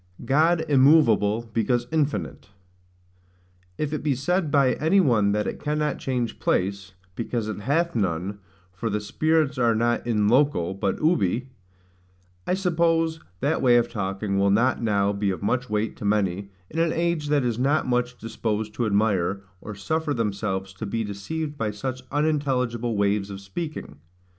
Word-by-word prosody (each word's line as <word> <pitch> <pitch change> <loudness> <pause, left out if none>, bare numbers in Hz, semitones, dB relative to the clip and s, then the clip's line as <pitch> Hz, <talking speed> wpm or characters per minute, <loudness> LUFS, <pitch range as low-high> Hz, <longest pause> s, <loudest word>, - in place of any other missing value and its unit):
God 160 +5 +3
immoveable 120 -6 +4
because 120 +2 +1
infinite. 150 -8 -2 1.3
If 150 0 -2
it 150 - -2
be 145 -3 +1
said 170 +5 0
by 140 -3 +3
any 160 +6 +3
one 115 - +3
that 105 0 0
it - - -4
cannot 150 -1 -1
change 125 -3 -2
place, 100 +1 -1 0.2
because 115 0 -3
it 110 - -4
hath 150 +9 0
none, 95 -1 -1 0.3
for 95 +5 -3
the 105 0 -1
spirits 155 +5 0
are 115 -2 +3
not 120 +2 0
IN 105 -3 +2
LOCO, 120 - +2
but 95 0 -2
UBI; 125 - +1 1.0
I 180 - +2
suppose 165 -3 +1 0.2
that 145 +4 +1
way 120 -2 +5
of 120 - +1
talking 100 -1 -2
will 100 0 +3
not 120 +6 +2
now 100 -3 +1
be 100 0 -1
of 95 +1 -3
much 125 +4 0
weight 105 +1 -1
to - - -9
many, 100 -2 0 0.2
in 165 - -3
an 165 -1 +2
age 170 -2 0
that 145 -2 +2
is 120 -2 -1
not 140 +4 +2
much 125 0 0
disposed 110 -1 -3
to 115 +1 -1
admire, 100 -2 +1 0.2
or 105 - -7
suffer 155 +9 -1
themselves 100 -4 -2
to 100 +3 -6
be 115 +3 -2
deceived 145 +10 -5
by 110 - 0
such 130 +5 -4
unintelligible 130 -6 0
ways 100 0 +1
of 100 -1 -7
speaking. 100 - -6
120 Hz, 160 wpm, -25 LUFS, 100-145 Hz, 1.3 s, way